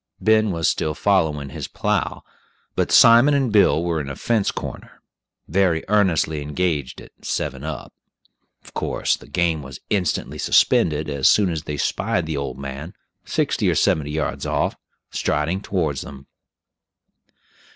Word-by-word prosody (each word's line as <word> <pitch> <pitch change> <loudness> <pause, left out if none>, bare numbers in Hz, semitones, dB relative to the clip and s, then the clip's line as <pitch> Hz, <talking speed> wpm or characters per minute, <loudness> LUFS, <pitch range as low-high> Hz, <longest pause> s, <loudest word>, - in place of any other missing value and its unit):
Ben 110 0 +3
was 85 -4 0
still 75 -1 0
following 80 -8 +1
his 75 -2 -6
plow, - - -2 0.5
but - - 0
Simon 120 +5 +7
and 135 -4 +1
Bill 100 -5 +4
were 85 -2 -1
in 70 - -6
a 70 - -5
fence 110 +1 0
corner, - - -7 0.4
very 90 -4 +1
earnestly 90 -7 +2
engaged 75 -2 -2
at - - -13
"seven 65 +1 -3
up." 75 -3 -6 0.7
Of - - -16
course - - 0
the - - -15
game 85 -3 0
was 65 -1 -9
instantly 95 -5 -1
suspended 75 -2 +3
as 70 -3 +2
soon 100 -4 +3
as 80 -2 -4
they 75 - -4
spied 100 +4 -1
the 80 -1 -3
old 70 0 -4
man, 70 +4 -7 0.3
sixty - - 0
or - - +1
seventy 75 -2 +1
yards 75 0 -3
off, - - 0 0.4
striding 80 +6 -1
towards 80 -9 -1
them. 70 0 -10
80 Hz, 150 wpm, -22 LUFS, 75-95 Hz, 0.7 s, Simon